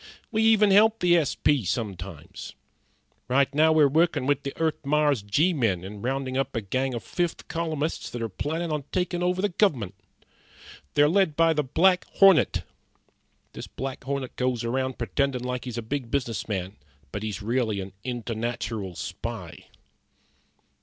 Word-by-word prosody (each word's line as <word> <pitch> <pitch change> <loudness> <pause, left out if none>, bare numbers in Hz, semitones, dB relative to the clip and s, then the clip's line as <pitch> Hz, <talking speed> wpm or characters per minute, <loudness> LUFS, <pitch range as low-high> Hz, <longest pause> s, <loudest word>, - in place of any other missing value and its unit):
We 220 - +1
even 220 -2 +5
help 215 +3 +6
the 175 -1 +4
S.P. 145 -4 +2
sometimes. 95 -5 -5 0.7
Right 135 +2 +2
now 155 +2 +4
we're 155 -2 +5
workin' 160 -1 +2
with 145 +1 +1
the 140 - -5
Earth 160 -2 -1
Mars 145 -3 +2
G 145 - +2
men 110 - 0
in 100 +2 -8
roundin' 130 +1 -2
up 135 -1 -1
a 115 - 0
gang 130 +5 -1
of 115 - -5
fifth 175 -2 -3
columnists 160 -2 -2
that 120 - -6
are - - -1
plannin' 160 - -3
on 150 -2 -2
takin' 180 -1 -1
over 180 +1 0
the 205 - +2
gov'ment. 140 - +1 1.0
They're 145 - +6
led 185 -2 +2
by 165 0 +4
the 150 - +1
Black 180 +7 +3
Hornet. 195 -5 +5 0.9
This - - -7
Black 135 -1 -6
Hornet 135 -2 -3
goes 125 -2 0
around 130 +2 -1
pretendin' 130 +1 -1
like 125 -1 -3
he's 120 -2 -5
a 115 - -3
big 125 +1 -4
business 115 -6 -2
man, 95 -1 -4 0.3
but 105 - -4
he's 105 -2 -4
really 115 -2 0
a 95 0 -6
internatural 115 -5 -4
spy." - - -6
135 Hz, 160 wpm, -26 LUFS, 115-160 Hz, 1.0 s, help